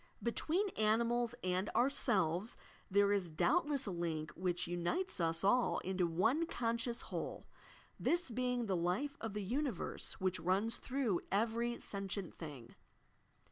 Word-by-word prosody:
Between 335 - +1
animals 235 - +1
and 185 +2 0
ourselves 205 - +2 0.3
there 200 +1 +4
is 190 -4 +1
doubtless 290 - +2
a 200 - -2
link 165 -3 -2
which 175 -1 -1
unites 175 - -1
us 165 0 +2
all 245 +5 +4
into 185 -1 +1
one 225 - +2
conscious 235 -1 -1
whole, - - -5 0.3
— - - -22 0.2
this 345 +1 +2
being 250 0 0
the 195 -3 0
life 185 +12 0
of 225 -2 -4
the 210 - -2
universe 250 - -2
which 185 -1 -1
runs 195 +7 +1
through 250 -9 0
every 230 +3 +1
sentient 195 -2 -3
thing. 140 -8 -8
205 Hz, 140 wpm, -36 LUFS, 180-245 Hz, 0.3 s, there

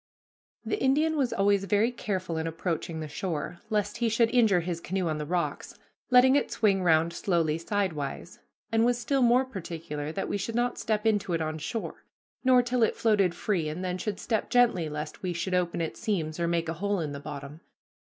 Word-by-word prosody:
The 415 - -2
Indian 305 +4 +3
was 270 -5 +1
always 200 0 +2
very 210 +5 +2
careful 185 -8 -3
in 160 - -2
approaching 165 -1 -3
the 155 - -4
shore, 170 +1 -4
lest 210 -1 -1
he 235 -1 +1
should 230 +1 +2
injure 220 -8 +4
his 170 0 -4
canoe 185 0 -2
on 155 -1 -1
the 150 - -4
rocks, 170 -4 -2 0.3
letting 255 +1 +6
it 285 - +2
swing 200 -4 +2
round 165 -1 +3
slowly 165 -4 0
sidewise, 170 -4 -3 0.3
and 225 0 +3
was 240 0 +3
still 260 +3 0
more 245 +2 +4
particular 165 - -5
that 195 - -3
we - - -1
should 225 +3 -3
not 240 0 0
step 215 0 -1
into 205 -5 +1
it 165 - 0
on 155 0 -3
shore, 225 +8 -5 0.4
nor 255 -1 +5
till 245 0 -1
it 225 - +3
floated 200 -6 +2
free, 175 -5 -1
and 175 +5 -4
then 180 0 -2
should 205 +1 -3
step 220 -2 -1
gently 230 -10 +3
lest 150 0 -6
we 180 -2 -2
should 180 +2 -3
open 175 -2 0
its 165 - -4
seams, 165 -7 -2
or 170 - +1
make 170 -1 0
a 165 - -1
hole 200 -1 0
in 155 -3 -3
the 140 - -6
bottom. 145 +1 -8
185 Hz, 205 wpm, -28 LUFS, 165-225 Hz, 0.4 s, letting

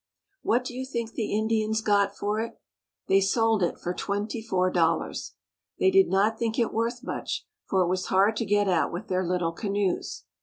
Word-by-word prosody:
What 240 +3 +2
do 250 - -5
you 255 +1 -4
think 235 -4 -4
the 220 -3 -3
Indians 220 0 +1
got 205 -2 +2
for 210 +1 -1
it? 230 +1 -5 0.5
They 195 0 +4
sold 225 +2 +2
it 175 - 0
for 175 - -3
twenty 205 +4 -3
four 185 -4 +1
dol 165 -2 +3
lars. - - -6 0.4
They 380 - +3
did 385 0 +5
not 210 +3 +2
think 225 -1 -1
it 235 - +1
worth 235 +3 -1
much, - - -4 0.2
for 190 -1 +2
it - - 0
was 185 +1 -1
hard 200 +3 +3
to 230 - -1
get 205 0 +2
at 175 -4 +2
with 180 +6 -6
their 185 0 +1
little 175 -1 0
canoes. 200 0 -2
205 Hz, 200 wpm, -27 LUFS, 185-225 Hz, 0.5 s, did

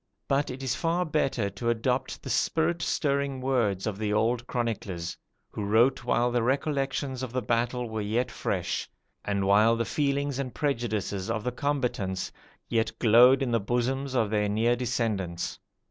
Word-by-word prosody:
But 140 +1 +1
it 130 +1 -6
is 130 -1 0
far 170 +5 0
better 135 -8 0
to 110 +4 -2
adopt 125 +3 -1
the - - -6
spirit 170 +1 +1
stirring 140 -4 0
words 120 -8 0
of 105 -2 -3
the 105 -1 -1
old 115 +3 +1
chroniclers, 100 -8 -3 0.4
who 105 - -4
wrote 115 +5 +3
while 120 0 +2
the 120 0 +1
recollections 135 0 -1
of 130 -3 -4
the 130 - 0
battle 120 +2 0
were 110 -1 -3
yet 115 +4 -1
fresh, - - -2 0.3
and 100 -1 -1
while 105 +4 +5
the 115 0 -1
feelings 140 -1 0
and 130 -3 -4
prejudices 110 -9 -1
of 110 - -1
the 125 - -1
combatants 125 -9 -2 0.4
yet 115 -1 0
glowed 125 +4 +6
in 125 - -1
the 115 - +3
bosoms 130 +5 -1
of 110 -4 +1
their 105 -1 +1
near 115 +3 +2
descendants. 110 -8 -2
120 Hz, 165 wpm, -28 LUFS, 110-135 Hz, 0.4 s, glowed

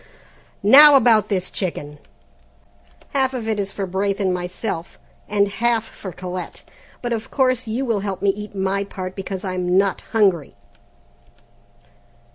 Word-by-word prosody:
"Now 285 +7 +9
about 230 -5 +4
this 185 -3 -1
chicken, 150 -6 -5 1.1
half 265 -1 +1
of 230 -3 -4
it 220 -2 -1
is 195 -1 -3
for 195 - -4
Braith 195 +2 -2
and 190 -2 +1
myself, 180 0 -5 0.3
and 205 -1 +2
half 230 +2 0
for 195 -4 -9
Colette, 180 +1 -7 0.4
but 240 -1 -1
of 225 -1 -5
course 255 -3 0
you 235 +5 -2
will 230 -4 0
help 195 -2 -4
me 200 - +4
eat 210 +1 -9
my 195 +1 -1
part 185 -2 -7
because 195 -1 -6
I'm 185 -1 -1
not 195 -1 +1
hungry." 190 -9 +1
200 Hz, 145 wpm, -21 LUFS, 185-225 Hz, 1.1 s, Now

